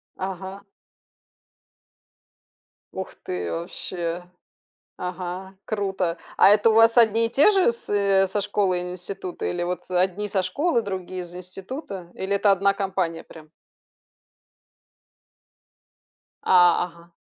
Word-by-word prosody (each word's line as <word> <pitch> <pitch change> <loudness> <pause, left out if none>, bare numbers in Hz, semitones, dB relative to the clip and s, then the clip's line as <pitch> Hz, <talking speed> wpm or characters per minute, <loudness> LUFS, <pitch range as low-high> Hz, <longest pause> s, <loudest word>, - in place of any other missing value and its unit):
Ага. 190 +1 -6 2.3
Ух - - -6
ты, 90 -1 -4
вообще! 170 - -4 0.8
Ага, 180 +1 -5
круто! 190 -5 -2 0.2
А - - +7
это 210 +2 +5
у - - +2
вас 225 +1 +6
одни 230 0 +5
и - - -3
те 285 - +6
же 380 - +3
с 235 - -11
э 200 -1 +3
со 205 +2 -1
школы 200 -2 +1
и - - -3
нь 180 - -5
института? 185 0 -5
Или 175 0 -2
вот, 180 0 -3
э, 180 - -1
одни 190 +3 +1
со 195 -2 0
школы, 240 - 0
другие 185 -2 -5
из 175 0 -11
института? 185 - -8
Или 195 +1 -1
это 200 0 +3
одна 195 +1 +3
компания 190 -4 -2
прям? 155 -1 -14 2.9
А, 175 -2 +5
ага. 170 0 -16
190 Hz, 130 wpm, -24 LUFS, 180-205 Hz, 2.9 s, А